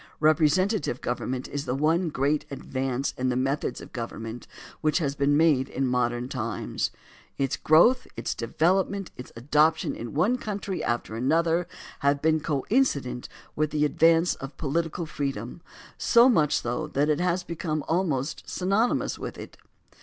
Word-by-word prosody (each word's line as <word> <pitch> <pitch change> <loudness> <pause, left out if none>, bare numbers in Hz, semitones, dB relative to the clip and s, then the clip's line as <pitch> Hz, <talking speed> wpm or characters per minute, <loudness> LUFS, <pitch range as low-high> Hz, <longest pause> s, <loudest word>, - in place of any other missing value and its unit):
Representative 155 - +2
government 125 +1 -3
is 145 0 -4
the 125 - -1
one 160 +5 +2
great 145 +1 0
advance 135 -1 -3
in 130 0 +1
the 125 - 0
methods 135 +1 -1
of - - -12
government 115 0 -6 0.3
which 155 -1 +2
has 145 -6 0
been 145 +1 +2
made 150 -5 +3
in 135 - -1
modern 125 -1 0
times. 115 -6 -3 0.5
Its 135 0 0
growth, 235 +12 +4
its - - -2
development, 185 - 0
its 125 - -10
adoption 150 +6 +2
in 120 +3 -7
one 210 +12 +2
coimtry 200 -4 -4
after 120 -2 -2
another 165 +7 +1 0.3
have 140 0 +2
been 160 +1 +2
coincident 145 - 0 0.3
with 155 0 +1
the 150 0 +1
advance 165 +3 +4
of 135 +1 -9
political 165 +3 -2
freedom, 140 -2 -4 0.4
so 235 +1 +6
much 155 - +3
so 120 0 -2
that 145 +2 0
it 150 -1 +1
has 180 0 0
become 155 -3 -3
almost 160 -5 -1
sjniony 200 +6 +1
mous - - -4
with - - -6
it. - - -9
150 Hz, 155 wpm, -26 LUFS, 130-170 Hz, 0.5 s, so